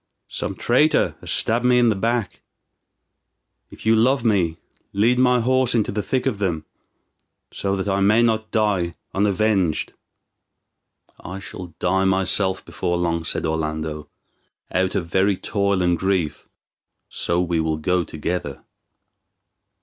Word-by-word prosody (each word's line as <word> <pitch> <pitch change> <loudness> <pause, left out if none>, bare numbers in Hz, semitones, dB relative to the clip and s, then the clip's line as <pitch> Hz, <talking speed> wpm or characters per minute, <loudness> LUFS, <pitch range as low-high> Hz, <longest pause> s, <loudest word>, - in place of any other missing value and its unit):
Some - - -4
traitor 140 +6 +2
has - - -8
stabbed 115 +2 +1
me 125 0 +4
in 120 -1 +4
the 110 - +1
back. 115 0 -2 1.3
If - - -13
you 110 0 +5
love 120 +3 +2
me, 90 -7 +2 0.4
lead 115 +5 +2
my 125 -1 +4
horse 130 0 +2
into 110 -3 +1
the 105 +1 -2
thick 130 +4 -1
of 120 -7 -1
them, 90 -6 -1 0.9
so 100 0 -1
that 95 +1 -3
I 100 0 +1
may 105 +4 +4
not 110 -1 0
die 100 -6 0 0.2
unavenged." 100 -4 +1 1.3
"I 95 - -7
shall 90 -3 -9
die 95 +2 +1
myself 95 0 +2
before 85 0 -2
long," 85 -1 -1
said - - -2
Orlando, 80 -1 -3 0.6
"out 95 +2 0
of 95 -4 -1
very 95 +3 +1
toil 100 -3 0
and 90 -1 +1
grief; 90 -6 -1 0.6
so 85 - -1
we 85 -2 0
will 80 -1 0
go 90 +3 0
together." 80 -3 -4
95 Hz, 140 wpm, -22 LUFS, 85-110 Hz, 1.3 s, you